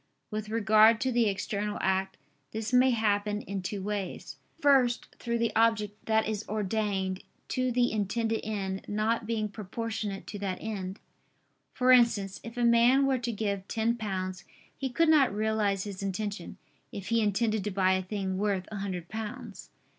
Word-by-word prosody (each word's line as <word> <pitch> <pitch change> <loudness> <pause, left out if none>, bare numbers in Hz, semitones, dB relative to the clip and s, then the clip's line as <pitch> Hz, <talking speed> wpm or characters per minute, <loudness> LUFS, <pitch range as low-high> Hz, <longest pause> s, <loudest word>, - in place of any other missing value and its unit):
With 215 0 -4
regard 220 0 +5
to 260 -1 +1
the 235 -3 +3
external 205 +1 -2
act 190 0 0 0.4
this 220 +2 -4
may 255 +1 +6
happen 210 -3 +1
in 195 -1 -4
two 190 +1 -4
ways. 205 -2 -4 0.2
First, 270 -5 +3
through 235 -1 -1
the 230 -2 0
object 215 -2 +1
that 220 -1 +2
is 215 -1 -2
ordained 200 -2 -1 0.3
to 255 -1 0
the 245 0 +2
intended 220 +2 -1
end 195 -3 -3
not 215 +2 0
being 220 -2 0
proportionate 210 0 -5
to 205 - -7
that 190 -2 -2
end; 195 -3 -5 0.7
for 255 0 +3
instance, 220 -6 +4
if 230 +2 -9
a 240 - +2
man 240 +4 +5
were 265 -2 +2
to 240 0 -2
give 200 -3 -2
ten 230 +1 0
pounds, 185 -4 -4 0.3
he 270 - -3
could 330 +6 +2
not 295 -5 +5
realize 210 -2 0
his 200 -2 -6
intention, 200 +2 -4 0.3
if 200 0 -7
he 230 0 +3
intended 215 0 +1
to - - 0
buy 190 -1 +2
a 185 - +1
thing 190 -1 -3
worth 200 -2 0
a 215 - -4
hundred 185 -4 -4
pounds. 220 +2 -7
215 Hz, 170 wpm, -29 LUFS, 195-230 Hz, 0.7 s, may